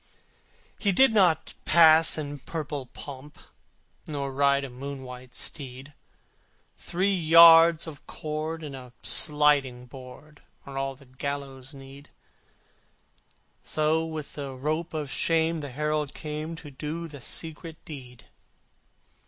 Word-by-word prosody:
He 205 - +2
did 265 +5 +5
not 180 -7 +2
pass 160 -1 +6
in 145 -2 -5
purple 145 -3 -5
pomp, 140 +2 -10 0.7
Nor 140 -2 -4
ride 140 0 +2
a 135 - -5
moon 135 +2 -7
white 125 -1 -11
steed. 135 0 -6 0.8
Three 190 +3 -1
yards 165 -1 +7
of 155 -4 -11
cord 155 +1 -5
and 145 -3 -7
a 125 -2 -11
sliding 145 -5 +3
board 130 +4 -13 0.2
Are 140 - -9
all 135 0 -3
the 140 +1 -18
gallows' 135 +1 -6
need: 135 +1 -13 1.5
So 155 +1 +1
with 160 -3 -6
rope 150 +5 -3
of 150 -3 -4
shame 165 0 +1
the 145 -2 -6
Herald 150 +2 -2
came 155 +2 -5
To 155 -3 -11
do 155 +5 -5
the 145 -4 -11
secret 160 +3 -6
deed. 125 -6 -11
150 Hz, 120 wpm, -26 LUFS, 135-160 Hz, 1.5 s, yards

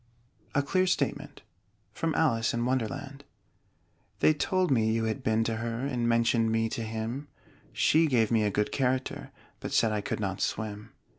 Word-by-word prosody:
A 140 - +3
CLEAR 185 +6 +1
STATEMENT 185 - -2 0.5
From 165 -1 -1
'Alice 115 -8 +2
in 120 0 0
Wonderland' 135 +3 -3 1.0
They 155 - +5
told 185 +3 0
me 110 -4 +3
you 115 0 0
had 110 +4 -2
been 110 -1 +2
to 115 0 -1
her, 115 +2 -3
And 120 -4 0
mentioned 115 -1 +2
me 115 0 +1
to 115 - -4
him: 115 +5 -4 0.4
She 160 +1 +3
gave 120 -6 +2
me 115 -2 +3
a 105 - +2
good 105 +1 -1
character, 130 -1 -1 0.3
But - - -6
said 110 - +3
I 105 -1 -1
could - - -3
not 95 -3 -3
swim. 105 0 -3
115 Hz, 170 wpm, -29 LUFS, 110-135 Hz, 1.0 s, They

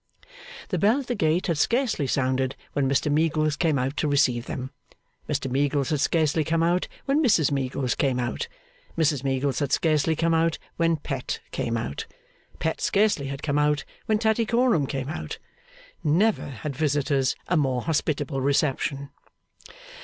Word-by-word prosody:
The - - -1
bell 220 +7 +4
at - - -9
the 245 - -2
gate 165 -4 +1
had 165 -5 0
scarcely 235 - +1
sounded 130 0 0 0.2
when 135 -2 +1
Mr 140 +2 +1
Meagles 155 0 +2
came 155 -1 +1
out 130 +2 -1
to 155 - +1
receive 125 -4 +2
them. 130 0 -5 0.6
Mr - - -1
Meagles 140 +2 0
had 150 - +1
scarcely 155 +1 +2
come 165 +2 +1
out, 175 +2 +1 0.2
when 285 +3 +2
Mrs 175 - +3
Meagles 135 -2 -1
came 130 -3 0
out. 120 -2 -2 0.5
Mrs 150 -4 +2
Meagles 135 -1 0
had 140 -2 -1
scarcely 160 0 +2
come 165 +1 +1
out, 165 0 +2 0.2
when 165 -1 +2
Pet 150 - -4
came - - -1
out. - - -4 0.5
Pet - - -2
scarcely 200 -9 +2
had 135 +1 -6
come 145 -1 +1
out, 150 0 +2 0.2
when 215 -2 +3
Tattycoram 225 - +2
came 135 -2 -3
out. 155 - -5 0.7
Never 185 +8 +2
had 140 +2 -6
visitors 140 -2 +1
a 180 - +1
more 130 -5 +1
hospitable 145 -3 -1
reception. 140 0 0
150 Hz, 160 wpm, -25 LUFS, 135-165 Hz, 0.7 s, bell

